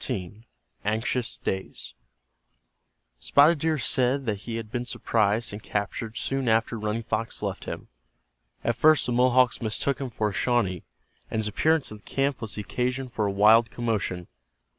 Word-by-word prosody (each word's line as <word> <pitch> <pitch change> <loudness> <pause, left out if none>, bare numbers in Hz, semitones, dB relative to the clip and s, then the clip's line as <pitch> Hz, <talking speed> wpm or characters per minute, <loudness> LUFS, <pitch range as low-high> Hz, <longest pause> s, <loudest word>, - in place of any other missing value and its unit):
CHAPTER - - -1 0.7
XIV—ANXIOUS 115 +3 -1
DAYS 95 0 -3 1.3
Spotted 150 +3 +5
Deer 160 +1 +1
said 130 +1 +2
that 105 -4 -1
he 115 - -2
had 115 -2 -6
been 120 -1 -2
surprised 110 -2 0
and 105 - -6
captured 110 +2 -3
soon 135 +2 -1
after 110 +1 +1
Running 105 +2 -2
Fox 115 0 -2
left - - -3
him. - - -6 0.8
At 120 - +1
first 155 +4 +5
the 125 - -1
Mohawks 125 +1 +3
mistook 120 +5 -1
him 135 - -3
for 110 -2 -1
a - - -7
Shawnee, 100 -4 +1 0.5
and - - -3
his 110 -1 0
appearance 155 +7 +1
in 105 - -7
the 105 - -23
camp 135 -1 -1
was 110 -2 -4
the 105 - -3
occasion 125 +4 -2
for 110 -3 -1
a - - 0
wild 110 +3 +5
commotion. 105 -7 -2
115 Hz, 165 wpm, -26 LUFS, 105-125 Hz, 1.3 s, Spotted